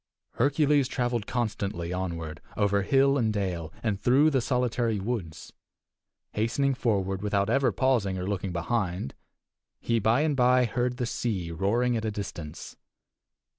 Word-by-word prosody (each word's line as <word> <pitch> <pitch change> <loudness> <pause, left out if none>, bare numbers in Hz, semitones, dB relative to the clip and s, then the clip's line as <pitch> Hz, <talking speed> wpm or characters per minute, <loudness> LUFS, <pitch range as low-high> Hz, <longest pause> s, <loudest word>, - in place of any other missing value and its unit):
Hercules 145 +1 +2
traveled 120 -4 -1
constantly 100 -7 -2
onward 85 -4 -4 0.2
over 100 -1 +2
hill 135 +6 +3
and 110 -3 +1
dale, 90 -6 -2
and 105 -4 -1
through 140 +7 +4
the 135 -3 +2
solitary 120 -3 0
woods. 95 -7 -5 0.8
Hastening 120 +6 +1
forward 100 -7 0
without 100 0 0
ever 130 -1 +3
pausing 105 -4 +1
or 90 - -3
looking 95 -1 -2
behind, 90 - -2 0.7
he, 115 -1 0
by 110 +6 +3
and 155 -2 +1
by, 125 0 +4
heard 125 +2 -1
the 125 - -1
sea 100 -8 -2
roaring 115 +8 +1
at 110 -1 -2
a - - +1
distance. 90 -7 -7
110 Hz, 140 wpm, -27 LUFS, 95-125 Hz, 0.8 s, through